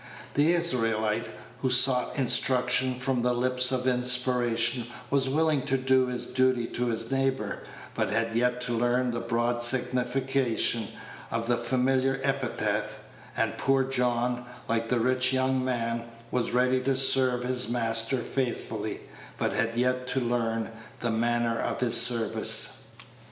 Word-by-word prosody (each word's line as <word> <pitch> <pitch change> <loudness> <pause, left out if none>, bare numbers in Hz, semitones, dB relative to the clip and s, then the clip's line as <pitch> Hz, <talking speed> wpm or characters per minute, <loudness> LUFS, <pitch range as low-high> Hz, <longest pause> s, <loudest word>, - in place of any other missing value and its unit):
The 150 +4 +3
Israelite 115 -9 0 0.3
who 130 - 0
sought 125 +2 +3
instruction 125 0 +2
from 130 -1 -1
the 125 0 +1
lips 125 +1 +3
of 125 -1 -1
inspiration 125 -2 +1 0.2
was 135 -1 +2
willing 155 0 +1
to 135 - +1
do 130 0 +2
his 125 -1 -4
duty 130 -2 +1
to 120 +1 -3
his 115 0 -1
neighbor, 135 0 -1 0.3
but - - -1
had 115 +2 0
yet 125 +1 +1
to 120 -1 -2
learn 120 +2 +1
the 120 - -3
broad 120 +1 -1
signification 125 -2 +1 0.4
of 115 0 -2
that 120 -1 0
familiar 130 +2 +1
epithet; 135 -2 -1 0.4
and - - -1
poor 135 0 +2
John, 125 -1 -1 0.2
like 115 0 -1
the 125 - +1
rich 130 +2 +2
young 130 0 +1
man, 115 -2 -2 0.3
was 125 -2 0
ready 125 +1 +2
to 135 +1 0
serve 130 -2 +2
his 125 -1 -1
Master 115 +1 +1
faithfully, 130 -3 -3 0.4
but - - -1
had 115 0 0
yet 125 +1 0
to 130 +2 -1
learn 115 -2 -1 0.3
the 120 - 0
manner 115 0 0
of - - -3
his 120 -2 +1
service. 115 -2 0
125 Hz, 145 wpm, -27 LUFS, 120-130 Hz, 0.4 s, The